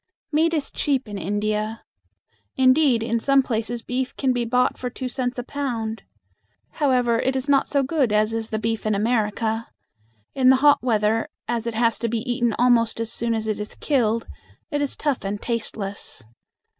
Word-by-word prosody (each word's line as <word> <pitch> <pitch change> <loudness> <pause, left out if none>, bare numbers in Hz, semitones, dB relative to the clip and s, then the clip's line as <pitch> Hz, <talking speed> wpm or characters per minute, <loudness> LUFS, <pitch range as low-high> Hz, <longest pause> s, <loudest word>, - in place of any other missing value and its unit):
Meat 320 +2 +3
is 295 - -1
cheap 270 -4 -1
in 205 -1 -5
India. 210 +3 -2 0.7
Indeed, 260 -2 +4
in 230 0 0
some 275 +3 +3
places 230 -1 -3
beef 255 +1 -3
can 265 -2 +1
be 240 -1 -1
bought 250 +2 +2
for 250 - -4
two 255 +1 -5
cents 250 0 -2
a 245 - -3
pound. 235 -5 -3 0.8
However, 250 -5 +3
it 265 +1 0
is 265 +1 -2
not 280 -1 +3
so 280 -1 +1
good 270 -4 +1
as 215 +1 +2
is 225 -1 -3
the 220 - -2
beef 225 0 -2
in 215 - +2
America. 220 +1 0 0.7
In 255 -1 +4
the 265 - +7
hot 290 - +6
weather, 220 -2 +1 0.2
as 235 -1 -2
it 230 - -3
has 230 0 +2
to 235 - -1
be 225 0 -1
eaten 240 -2 0
almost 235 -2 +3
as 230 0 -2
soon 230 0 0
as 220 -1 -2
it 215 -1 -1
is 210 - -6
killed, 230 -6 +1 0.5
it 290 -1 0
is 285 - -2
tough 290 -4 -1
and 200 +1 -3
tasteless. 205 - -5
235 Hz, 185 wpm, -23 LUFS, 220-260 Hz, 0.8 s, the